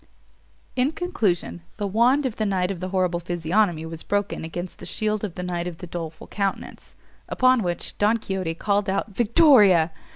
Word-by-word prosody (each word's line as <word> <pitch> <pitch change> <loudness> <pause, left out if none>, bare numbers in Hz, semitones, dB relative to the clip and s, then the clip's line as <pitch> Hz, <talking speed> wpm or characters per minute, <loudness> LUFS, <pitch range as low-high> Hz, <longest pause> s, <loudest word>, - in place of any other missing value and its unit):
In 260 +4 +1
conclusion, 210 - -1 0.2
the 205 - -2
wand 240 +8 +3
of 245 -4 -3
the 215 - 0
knight 185 -1 0
of 185 - -5
the 185 +1 -4
horrible 180 -2 0
physiognomy 175 0 0
was 160 0 -7
broken 205 -3 -2
against 175 +2 -6
the - - -9
shield 215 -1 -1
of 200 -5 -4
the 180 - -5
knight 175 -1 -3
of 175 -2 -6
the 180 - -8
doleful 165 -2 -7
countenance; 200 -2 -4 0.3
upon 255 -1 +3
which 175 -3 -3
Don 210 +3 +3
Quixote 190 -6 -3
called 205 +2 0
out 195 +2 -1
victoria! 215 - +5
195 Hz, 175 wpm, -24 LUFS, 175-215 Hz, 0.3 s, victoria